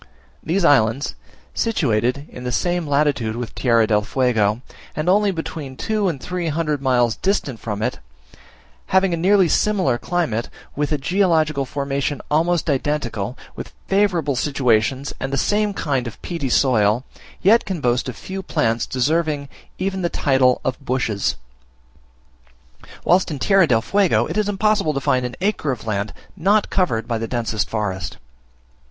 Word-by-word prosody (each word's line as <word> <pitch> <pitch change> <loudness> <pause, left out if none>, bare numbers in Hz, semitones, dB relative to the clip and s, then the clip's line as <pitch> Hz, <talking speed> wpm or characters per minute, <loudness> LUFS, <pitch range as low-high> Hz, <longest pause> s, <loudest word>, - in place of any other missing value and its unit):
These 175 +2 0
islands, 135 -2 +3 0.4
situated 125 - 0
in 125 - -9
the 125 - -2
same 175 +5 0
latitude 140 -6 +1
with 120 -1 -5
Tierra 115 -3 +3
del 105 -1 +2
Fuego 115 -1 +1 0.3
and 155 +3 -3
only 205 +3 +4
between 160 -6 -5
two 215 -2 0
and 160 -7 -2
three 180 +3 -3
hundred 150 -2 -1
miles 120 -4 +2
distant 145 - -1
from 105 -1 -4
it, - - -2 0.9
having 190 -1 +3
a - - +2
nearly 190 +2 +4
similar 175 -8 +1
climate, 155 -11 -1 0.3
with 150 +1 -1
a 150 - +2
geological 155 -3 +1
formation 140 +1 -2
almost 165 +2 +2
identical, 130 -6 -1 0.2
with - - -8
favourable 185 -8 +1
situations 130 -1 +1
and 135 - -3
the 140 - 0
same 210 +4 +1
kind 140 -10 -1
of 115 - -9
peaty 165 -7 -3
soil, 120 -3 +3 0.4
yet 220 +5 +5
can 190 -4 -4
boast 125 -1 0
of 125 - -6
few 190 +8 -6
plants 115 -9 0
deserving 150 +2 0 0.3
even 190 0 -2
the 170 - 0
title 130 -5 +2
of 130 +1 -2
bushes; 125 -6 -1 1.7
whilst 185 +2 +3
in 150 - -4
Tierra 195 +4 +4
del 115 -4 +2
Fuego 195 +5 +2
it - - -5
is 210 -1 +1
impossible 205 -6 +1
to - - +1
find 130 -1 +1
an 125 - -9
acre 195 -7 0
of 120 -4 -6
land 100 -1 -2 0.2
not 200 +5 +2
covered 115 - 0
by 115 -2 -1
the 115 - -3
densest 115 -3 -2
forest. 95 -6 -3
140 Hz, 155 wpm, -21 LUFS, 120-175 Hz, 1.7 s, yet